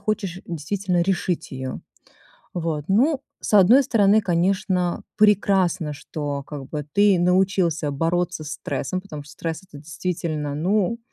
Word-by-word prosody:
хочешь 200 -3 -2
действительно 175 +3 -1
решить 180 -3 -1
её. 130 -1 -5 0.8
Вот, 160 -4 -2
ну, 260 +9 +3 0.2
с - - -2
одной 225 +9 +7
стороны, 210 -2 +4
конечно, 180 -1 0
прекрасно, 190 -6 +3
что 145 -1 -5
как 145 -1 -8
бы 150 -2 -4
ты 200 -2 +4
научился 180 -4 +2
бороться 170 +3 -1
стрессом, 160 +4 -4
потому 155 -7 -8
что 145 - -15
стресс 160 +3 -5
это 150 -6 -13
действительно, 155 -2 -3
ну 200 +6 +1
180 Hz, 130 wpm, -23 LUFS, 155-195 Hz, 0.8 s, одной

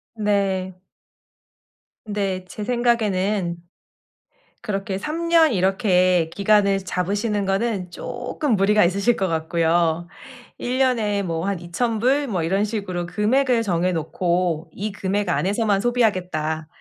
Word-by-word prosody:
네. 195 -3 0 1.4
네. 195 -3 -2
제 210 - -6
생각에는 210 -6 +1 1.1
그렇게 195 -2 -3
3 310 - -4
년 325 -5 +5
이렇게 185 -3 +2
기간을 200 -1 +3
잡으시는 200 +3 -1
거는 195 -2 -1
쪼끔 250 - -2
무리가 210 +2 +4
있으실 200 +6 +2
것 190 - -1
같고요. 165 0 +1 0.5
1 250 +1 -2
년에 225 -6 +1
뭐 165 -1 -2
한 200 -3 -1
$2,000 235 +10 0
뭐 190 -8 -1
이런 190 +5 +1
식으로 200 -5 -3
'금액을 235 +6 +1
정해 180 -3 0
놓고 170 0 -1
이 210 +2 -4
금액 200 0 -2
안에서만 200 +3 +1
소비하겠다.' 180 -10 0
195 Hz, 230 characters per minute, -22 LUFS, 180-220 Hz, 1.4 s, 년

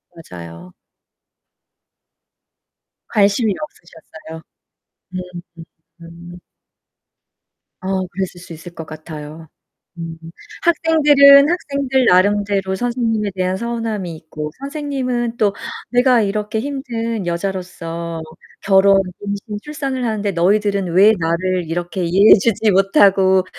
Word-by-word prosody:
맞아요. 85 - -11 2.4
관심이 205 +1 +2
없으셨어요? 160 - -11 0.7
음 185 - -2 0.4
음. 165 - -9 0.7
음. - - -11 1.4
어 190 0 -2
그랬을 180 0 -5
수 175 - -13
있을 170 +2 -11
것 160 - -7
같아요. 155 0 -10 0.5
음 165 -1 -7 0.5
학생들은 295 -4 +6
학생들 280 -6 0
나름대로 200 0 +2
선생님에 225 -2 -1
대한 185 0 -1
서운함이 220 -5 -4
있고 155 -1 -7
선생님은 265 -5 -3
또 205 -2 +1 0.4
'내가 245 -1 +4
이렇게 210 +1 -2
힘든 230 -5 -4
여자로서 170 -2 -4 0.4
결혼, 195 0 +4 0.2
임신, 205 +1 -5
출산을 275 -4 -4
하는데 215 -3 -1
너희들은 200 +2 +1
왜 200 +5 +6
나를 175 +1 -1
이렇게 175 +2 -3
이해해 190 +5 +6
주지 220 +1 +1
못하고 195 -1 +4
195 Hz, 235 characters per minute, -18 LUFS, 175-235 Hz, 2.4 s, 학생들은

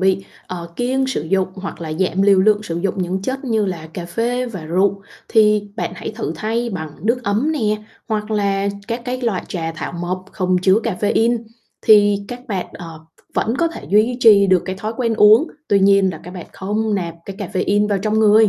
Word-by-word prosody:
bị, 190 0 +2 0.2
ờ, 170 -2 -7
kiêng 260 +2 0
sử 260 - -2
dụng 185 +4 0
hoặc 190 -3 -7
là 160 -2 -4
giảm 190 +3 0
liều 200 -1 +5
lượng 210 +1 +3
sử 170 -5 -4
dụng 185 +1 -1
những 185 +2 -2
chất 265 +5 -3
như 220 -4 +1
là 170 -4 -4
cà 175 - -5
phê 240 +6 -1
và 190 -9 -7
rượu, 195 +4 +1 0.3
thì 210 -2 +3
bạn - - -2
hãy - - -6
thử 220 -8 -3
thay 230 +6 -2
bằng 160 -6 -5
nước 235 +4 +1
ấm 230 +8 +1
nè, 215 -8 0 0.3
hoặc 215 0 -2
là 200 -2 +1 0.2
các 235 +1 -3
cái 255 0 -3
loại 230 -7 -1
trà 165 -3 -3
thảo 160 - -6
mộc 180 +2 -4
không 185 -2 +1
chứa 190 +3 +4
cafeine, 225 +3 +1 0.4
thì 205 -2 +5
các 245 0 -6
bạn, 190 -4 -2
ờ, 165 -2 -9 0.2
v - - -30
vẫn 225 - +1
có 335 - +2
thể 330 - -9
duy 215 +5 +3
trì 205 -4 +7
được 185 -2 +3
cái 190 0 -4
thói 215 +2 -3
quen 230 -3 0
uống, 215 +7 +6 0.2
tuy 200 -1 +4
nhiên 195 -1 +4
là 160 - -8
các 180 - -8
bạn 180 -2 -8
không 210 +2 -1
nạp 170 -4 -3
cái 195 - -8
cafeine 205 +1 0
vào 200 -2 +1
trong 215 +2 0
người. 215 0 +6
200 Hz, 220 wpm, -19 LUFS, 185-220 Hz, 0.4 s, trì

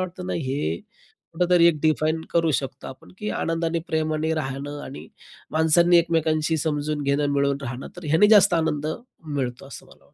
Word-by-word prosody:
वाटतं 180 0 -5
ना, - - -3
हे 130 - -2 0.6
कुठेतरी 175 0 +4
एक 155 -3 0
डिफाईन 155 0 +1
करू 165 -1 +2
शकतो 135 -1 -8
आपण, 130 - -13
की 210 - -3
आनंदाने 165 0 -1
प्रेमाने 155 0 0
राहणं 145 0 -4
आणि 135 - -10 0.4
माणसांनी 170 +2 +4
एकमेकांशी 160 -1 +1
समजून 150 -1 -2
घेणं, 140 +1 +1
मिळून 140 0 +1
राहणं, 125 0 -6
तर 175 - -10
ह्यांनी 160 +7 +4
जास्त 205 -4 +6
आनंद 155 -3 0 0.5
मिळतो, 125 -1 -3
असं 135 - -11
मला - - -20
वाटतं. - - -28
155 Hz, 165 wpm, -24 LUFS, 140-170 Hz, 0.6 s, जास्त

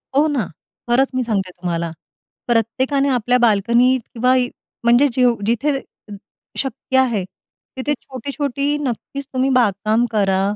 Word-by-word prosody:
हो 295 +3 +4
ना. 275 -9 0 0.4
खरंच 260 +3 +3
मी 255 - +1
सांगते 200 -5 -1
तुम्हाला 170 -2 -3 0.6
प्रत्येकाने 260 +5 +1
आपल्या 245 -1 +2
बाल्कनी 235 +3 +4
किंवा 250 +1 0 0.5
म्हणजे 240 +4 +5
जेव्ह 245 -1 +3
जिथे 270 +6 +1 0.8
शक्य 260 0 -2
आहे, 235 -7 +1 0.5
तिथे 285 +3 0
छोटी-छोटी 280 +2 -3
नक्कीच 280 0 -4
तुम्ही 260 +1 +1
बागकाम 220 0 +2
करा. 195 -3 +2
245 Hz, 120 wpm, -20 LUFS, 220-270 Hz, 0.8 s, म्हणजे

